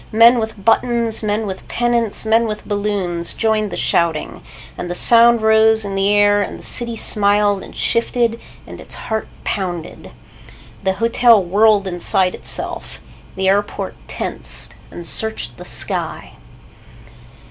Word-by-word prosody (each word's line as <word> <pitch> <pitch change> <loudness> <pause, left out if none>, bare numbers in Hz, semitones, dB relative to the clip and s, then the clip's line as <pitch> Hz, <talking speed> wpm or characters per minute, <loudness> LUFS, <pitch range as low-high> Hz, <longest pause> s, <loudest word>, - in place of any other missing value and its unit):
Men 230 +2 +6
with 220 -3 -6
buttons, 230 0 +2
men 215 0 -1
with 190 -2 -7
pennants, 235 -3 -1
men 225 +1 +2
with 210 -1 -6
balloons 200 -5 -2
joined 215 -1 0
the - - -5
shouting, 170 -2 -1 0.3
and 175 - -6
the 175 - -3
sound 235 +2 +5
rose 220 0 +4
in 200 - -5
the 195 +1 +1
air 205 0 +3
and - - -4
the - - -14
city 235 -1 -2
smiled 205 -2 +2
and - - -12
shifted 230 0 0 0.3
and - - -11
its - - -8
heart 220 -1 -4 0.2
pounded. 175 -5 -5 0.7
The 190 0 0
hotel 230 +1 +3
whirred 205 +2 +3
inside 185 +1 0
itself. - - 0 0.4
The 190 0 -1
airport 200 +2 -1
tensed - - -6 0.2
and 170 - -9
searched 165 - -1
the - - -10
sky. - - -4
210 Hz, 140 wpm, -18 LUFS, 195-225 Hz, 0.7 s, Men